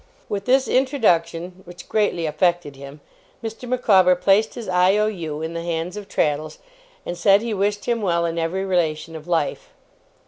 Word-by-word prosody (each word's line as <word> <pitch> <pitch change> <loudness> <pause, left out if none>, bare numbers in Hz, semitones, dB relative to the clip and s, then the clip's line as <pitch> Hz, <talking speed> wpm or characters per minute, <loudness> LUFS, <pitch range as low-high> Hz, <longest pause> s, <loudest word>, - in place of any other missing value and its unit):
With 200 -1 -3
this 265 +1 +3
introduction 180 - +1
(which 175 0 -12
greatly 205 -6 0
affected 170 -2 0
him), 140 +2 -11 0.4
Mr. 225 +2 -6
Micawber 195 -8 +4
placed 200 +4 +2
his 235 - -7
I.O.U. 180 -4 +1
in 160 +1 -4
the 170 - -4
hands 170 +2 -3
of 205 -1 -8
Traddles, 150 +1 -1 0.5
and 175 - -4
said 195 +4 +4
he 230 -2 -2
wished 205 +1 -1
him 235 -2 0
well 170 -4 +1
in 165 0 -2
every 180 +4 -2
relation 165 -3 -1
of 155 +1 -9
life. 165 -4 -1
180 Hz, 165 wpm, -22 LUFS, 165-210 Hz, 0.5 s, Micawber